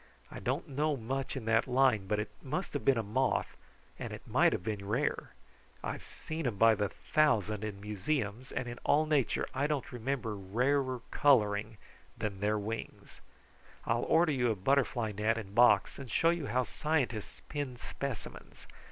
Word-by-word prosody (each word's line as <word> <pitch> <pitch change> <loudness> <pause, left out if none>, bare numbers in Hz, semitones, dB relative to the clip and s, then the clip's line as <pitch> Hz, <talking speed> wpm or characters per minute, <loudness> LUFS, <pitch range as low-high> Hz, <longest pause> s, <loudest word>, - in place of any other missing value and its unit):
I - - -7
don't 130 - -2
know 145 +1 0
much 135 +4 -3
in 120 - -6
that 115 +2 +3
line, 125 -6 +3
but 105 - +1
it 105 - -3
must 155 +8 -3
have 145 - -2
been 135 -3 +4
a 115 - 0
moth, 130 +6 0 0.4
and - - -5
it - - -8
might - - +4
have - - -2
been 100 -1 -3
rare. 125 +8 -1 0.5
I've - - -5
seen 160 0 -5
them 115 -5 -1
by 115 +2 +6
the 105 -2 0
thousand 110 - +1
in 105 -2 -4
museums, 105 +3 -2
and 130 - -3
in 120 0 -6
all 155 +2 +3
nature 150 -5 +1
I 140 +2 +1
don't 150 -3 -2
remember 120 -2 -2
rarer 125 +6 0
coloring 110 -5 +3 0.4
than 100 -3 -3
their 105 +1 +1
wings. 110 +2 -6 0.6
I'll - - +1
order 165 -1 +4
you 125 -4 +1
a 110 - +1
butterfly 120 +1 +1
net 110 +3 0
and 100 -3 -6
box 120 +4 +5
and 135 -3 -8
show 165 +7 +3
you 170 -5 -2
how 125 +1 +1
scientists 130 -6 -2
pin 145 -4 -4
specimens. 135 -1 -7
120 Hz, 175 wpm, -32 LUFS, 105-140 Hz, 0.6 s, by